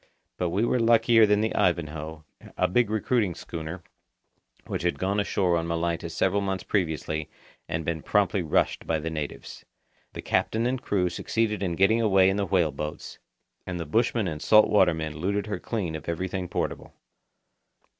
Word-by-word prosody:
But 90 - -1
we 100 +7 +1
were 125 - +1
luckier 115 -1 +5
than 105 0 +3
the 110 - 0
Ivanhoe, 80 -2 -1 0.3
a - - +3
big 120 +3 +2
recruiting 110 -3 0
schooner, 85 +1 -7 0.8
which - - -4
had 90 +1 0
gone 100 +2 0
ashore 95 -3 +1
on 85 0 -1
Malaita 85 0 -2
several 95 +4 +1
months 95 -2 -2
previously 80 -4 -2 0.4
and 80 0 -2
been 80 -1 -2
promptly 100 0 +1
rushed 80 - 0
by 80 - +1
the 80 +1 -4
natives. 75 -2 -6 0.5
The - - -7
captain 115 +1 0
and 130 +1 -1
crew 95 -7 0
succeeded 105 +3 -1
in 90 -4 -1
getting 110 +6 +3
away 95 -3 +4
in 95 - -2
the 100 -1 -1
whale 85 -4 +2
boats, 75 +2 -6 0.5
and 90 -1 -4
the 85 - -3
bushmen 115 +4 +1
and 75 -3 -5
salt 110 0 +6
water 95 -5 +4
men 80 -1 -5
looted 100 +5 -1
her 100 -4 -4
clean 95 -8 -3
of 80 - -6
everything 90 +2 -3
portable. - - -4
95 Hz, 175 wpm, -26 LUFS, 80-105 Hz, 0.8 s, salt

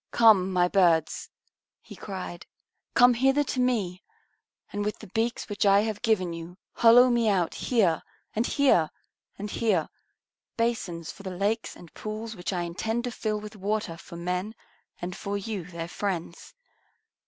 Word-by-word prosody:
Come, 210 -5 +5
my 180 -1 +3
birds," 170 -5 +2 0.5
He - - -13
cried, 185 -3 -7 0.5
"come 245 0 +7
hither 270 +4 +3
to 260 - -3
me, 215 -8 0 0.7
and 205 0 -1
with 210 +1 -2
the - - -11
beaks 230 +2 -1
which 205 -1 -1
I 200 0 +6
have 215 -1 -3
given 195 -7 +1
you 170 +2 -8 0.2
hollow 245 +2 +7
me 235 -2 +3
out 180 -5 +1
here, 195 -10 +1 0.3
and 225 +3 +1
here, 260 - +3 0.5
and 205 +1 -5
here, 200 -9 +1 0.7
basins 195 -8 -1
for - - -13
the 195 - -5
lakes 215 +4 -1
and 170 - -14
pools 215 +1 -6
which 175 +1 -4
I 175 -2 -1
intend 220 +7 -2
to 245 - -3
fill 215 -2 -2
with 210 +1 -9
water 205 -3 -2
for 170 - -12
men 180 +5 -3 0.4
and 175 +1 -5
for 200 0 -3
you, 200 -3 -4
their 170 -1 -6
friends. 180 - -4
205 Hz, 160 wpm, -27 LUFS, 180-225 Hz, 0.7 s, come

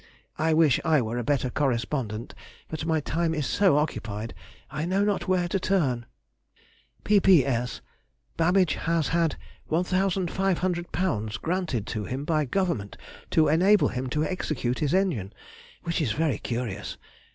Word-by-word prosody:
I 160 0 +2
wish 155 -5 +4
I 155 -2 +4
were 120 0 -2
a - - -2
better 130 -1 0
correspondent, 120 -4 -2 0.4
but 160 0 -4
my 160 -2 +1
time 165 +2 -1
is 150 -3 -1
so 190 -3 +3
occupied, 110 -7 -2 0.4
I 150 0 -3
know 190 +4 +1
not 205 -1 0
where 185 -2 +2
to 195 - 0
turn. 140 -12 0 1.0
P.P.S.—Babbage 155 - +1
has 165 -2 0
had 165 -2 +1 0.3
£1,500 180 - 0
granted 165 - -1
him 125 +6 -4
by 155 -1 +1
Government 155 - -1 0.3
to 155 -1 +4
enable 185 +7 +4
him 130 +1 -3
to 150 +4 0
execute 155 -9 -2
his 150 +2 +1
engine, 140 - 0 0.5
which 170 -1 -1
is 120 -9 0
very 150 -7 0
curious. 115 -5 -4
155 Hz, 130 wpm, -26 LUFS, 120-180 Hz, 1.0 s, wish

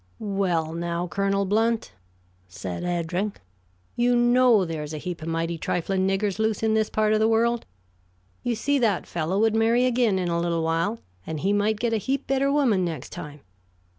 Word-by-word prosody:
"Well, 185 -6 -1
now, 170 +1 -2
Colonel 195 +3 0
Blount," 225 +3 +1 0.6
said 90 0 -6
Eddring, 175 +3 -2 0.6
"you 245 +1 +2
know 240 -3 +4
there's 155 -2 -5
a - - -4
heap 170 +2 -6
of 160 - -6
mighty 165 0 -2
trifling 190 +3 -1
niggers 195 +1 0
loose 220 0 0
in 220 -1 +2
this 220 -1 +1
part 215 0 +1
of 215 - +3
the 220 - +3
world. 230 +1 +1 0.7
You 240 -1 -1
see, 285 +5 +1
that 220 -6 +1
fellow 170 +3 -2
would 220 0 +3
marry 230 +3 +3
again 240 -5 +2
in 180 -1 -1
a 170 0 0
little 170 -1 0
while, 165 +7 0 0.3
and 155 -2 -4
he 195 +2 +1
might 205 +1 +1
get 235 -1 0
a - - +2
heap 270 +6 -2
better 275 +1 +1
woman 250 -10 +2
next 160 -7 -4
time. 150 -4 -8
200 Hz, 185 wpm, -25 LUFS, 170-225 Hz, 0.7 s, know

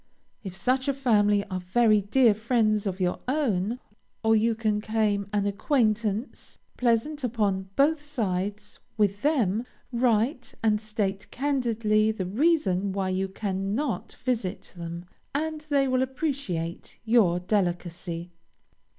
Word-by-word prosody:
If 190 -3 -6
such 255 +8 +1
a 280 - +1
family 205 -6 +3
are 185 - -1
very 215 +3 +3
dear 225 +3 +4
friends 215 -1 +1
of 190 0 -3
your 180 -1 0
own, 240 -6 0 0.5
or 225 0 +4
you 225 +1 +2
can 215 -2 0
claim 210 -2 0
an 205 -1 +1
acquaintance, 215 0 0 0.2
pleasant 250 +5 +1
upon 205 -5 0
both 295 +2 +3
sides, 210 -7 -3 0.2
with 205 -1 +1
them, 235 - +2 0.3
write, 245 +2 +1
and 215 -1 +2
state 205 -2 -2
candidly 230 -6 +1
the 200 -4 -4
reason 200 - +1
why 190 -1 -1
you 190 +1 0
cannot 200 +6 -2
visit 235 -7 -2
them, 170 0 -6 0.3
and 310 +1 -2
they 280 -2 +3
will 255 0 +2
appreciate 260 - -3
your 215 -7 +4
delicacy. 175 -2 -2
215 Hz, 125 wpm, -27 LUFS, 195-250 Hz, 0.5 s, dear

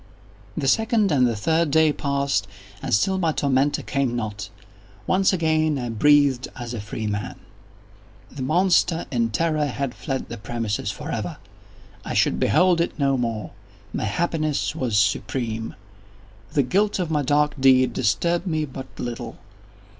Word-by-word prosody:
The 135 - -1
second 220 - +2
and 130 -4 +4
the 115 - -1
third 160 +9 +1
day 155 +1 +4
passed, 140 -9 -1 0.3
and - - -4
still 190 - +2
my 165 -3 +1
tormentor 140 -1 +1
came 135 -3 -1
not. 105 -4 -4 0.6
Once 190 - +3
again 160 -4 +1
I 120 -2 -3
breathed 140 +2 +3
as 120 -1 -6
a 115 - -4
freeman. 105 0 -4 1.0
The 140 - -8
monster, 170 +3 +2
in 115 -3 +1
terror, 155 +3 0
had 135 -1 -3
fled 135 -3 -4
the - - -7
premises 110 0 -3
forever! - - -4 0.7
I - - -4
should - - +2
behold 180 -2 +3
it 170 - -2
no 140 -2 +2
more! 115 -4 -3 0.4
My - - -2
happiness 155 +6 -1
was 125 -9 0
supreme! 110 +2 -1 0.8
The 140 - +3
guilt 200 +11 +1
of 175 -4 -2
my 150 -2 +1
dark 145 +2 +2
deed 130 -2 +5
disturbed 170 - 0
me 155 -3 0
but 130 -1 -8
little. 120 -1 -5
140 Hz, 145 wpm, -23 LUFS, 120-160 Hz, 1.0 s, deed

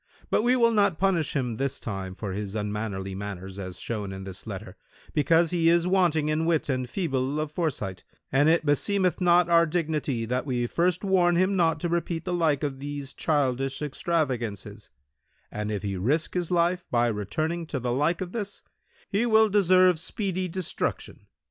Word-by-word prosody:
But - - +3
we 245 +3 +3
will 235 -2 +4
not 205 -6 +2
punish 180 -5 +1
him 125 -5 -1
this 140 +1 -2
time 95 -3 -5
for 100 -1 -5
his 100 +1 -4
unmannerly 105 -2 -3
manners 95 -1 -6
as 95 -2 -6
shown 105 -4 -4
in 95 0 -7
this 95 -1 -9
letter, - - -7 0.4
because 165 +2 +3
he 165 -2 +3
is 170 0 +3
wanting 175 -5 +2
in 155 +1 0
wit 160 -3 +1
and 130 -2 -1
feeble 140 -5 -1
of 155 -1 -3
foresight, 130 - -3 0.3
and 145 +3 +4
it 165 -1 +3
beseemeth 180 +5 +1
our 170 -1 +5
dignity 150 -7 -1
that 125 +3 -1
we 120 -2 0
first 175 - 0
warn 180 -3 +3
him 185 +3 +2
not 165 -3 +2
to - - 0
repeat 170 -1 -2
the 180 - -2
like 160 -5 +1
of 135 -2 -2
these 145 -1 -6
childish 135 -3 0
extravagances; 135 - -2 0.6
and 105 0 -3
if 105 -3 -3
he 100 -1 -2
risk 140 - 0
his 175 -2 -1
life 175 0 +1
by 120 0 +2
returning 155 - -2
to 140 - -3
the 125 0 -2
like 150 +7 +1
of 180 -1 -4
this, 205 -2 -5 0.4
he 220 +5 0
will 220 -1 +5
deserve 185 -3 +4
speedy 185 0 -2
destruction. 180 0 -4
155 Hz, 180 wpm, -26 LUFS, 120-175 Hz, 0.6 s, our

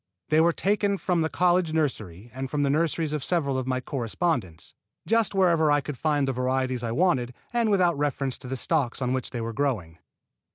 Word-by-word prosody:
They 155 +1 +4
were 170 +1 +4
taken 200 +2 0
from 180 -3 0
the 160 - 0
college 175 -2 +2
nursery 115 - -2
and 130 +1 -5
from 145 0 0
the 140 - +2
nurseries 160 0 0
of 150 -3 -2
several 145 -6 0
of 130 - -5
my 130 -1 0
correspondents, 120 - -3 0.3
just 225 -2 +2
wherever 170 -5 +3
I 145 - +4
could 145 0 -5
find 145 +1 0
the - - +1
varieties 130 0 -1
I 115 - -2
wanted, 125 -4 +1 0.2
and 235 -2 +2
without 180 -4 +3
reference 140 -2 -1
to - - -10
the 130 +1 -3
stocks 140 -3 0
on 125 -1 -1
which 130 - -2
they 120 - -4
were 115 0 -4
growing. 105 - -2
145 Hz, 205 wpm, -26 LUFS, 125-170 Hz, 0.3 s, They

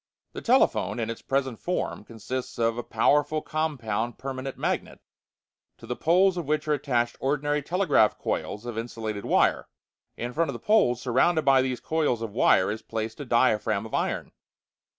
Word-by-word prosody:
The - - -6
telephone, - - +2
in 115 0 -2
its 115 - -8
present 135 -4 -1
form, 180 -10 -3
consists 115 +4 -6
of 115 -1 +1
a 120 - -3
powerful 150 +6 +2
compound 120 -8 -2
permanent 135 0 -5
magnet, - - -2 0.8
to - - -13
the - - -3
poles 180 +3 +3
of 170 -5 -4
which 150 0 0
are 150 - +3
attached 125 -5 0
ordinary 145 +2 0
telegraph 150 - +2
coils 105 +3 -3
of 120 -2 -4
insulated 110 -3 -5
wire. - - +2 0.5
In 120 +1 -4
front 165 +2 0
of - - -2
the - - -5
poles, 210 - +3
surrounded 150 +7 +2
by 135 -1 +5
these 130 -1 -2
coils 150 -8 0
of 110 - -4
wire, 100 -4 +4
is 110 +1 -5
placed 110 +2 -5
a 145 - -5
diaphragm 110 -3 +2
of 110 - -10
iron. - - -1
130 Hz, 170 wpm, -26 LUFS, 115-150 Hz, 0.8 s, by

